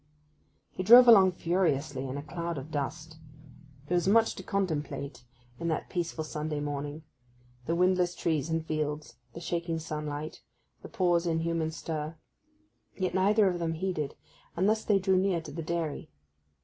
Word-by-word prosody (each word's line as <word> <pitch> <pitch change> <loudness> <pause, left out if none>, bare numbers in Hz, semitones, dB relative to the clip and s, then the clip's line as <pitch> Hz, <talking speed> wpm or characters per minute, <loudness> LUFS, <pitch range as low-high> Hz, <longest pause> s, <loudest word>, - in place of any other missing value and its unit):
He - - -5
drove 240 +6 +9
along 195 -5 +8
furiously, 155 -6 0
in 130 +2 -4
a 145 - -5
cloud 170 +1 -4
of 140 +4 -7
dust. 155 +2 -4 0.7
There 170 - -3
was 175 0 +2
much 225 +3 +4
to - - -8
contemplate 150 - -3 0.4
in 170 - -3
that 160 -2 -2
peaceful 170 -2 -2
Sunday 150 -1 -3
morning—the 140 -3 -6
windless 180 0 +2
trees 155 -2 -1
and 160 0 -1
fields, 150 -1 -3 0.2
the - - -7
shaking 170 0 -2
sunlight, 150 -1 -5 0.4
the - - -10
pause 175 -2 +1
in 165 -1 +1
human 165 -1 -1
stir. 160 0 -5 0.8
Yet 185 -2 -1
neither 200 +3 +4
of 180 -2 0
them 165 -1 -1
heeded, 160 -5 -2 0.4
and 185 +3 +2
thus 220 +1 +2
they 205 - +3
drew 190 0 +2
near 185 -2 +2
to 160 -2 -9
the 165 +3 -5
dairy. 165 -2 -3
165 Hz, 160 wpm, -29 LUFS, 150-180 Hz, 0.8 s, drove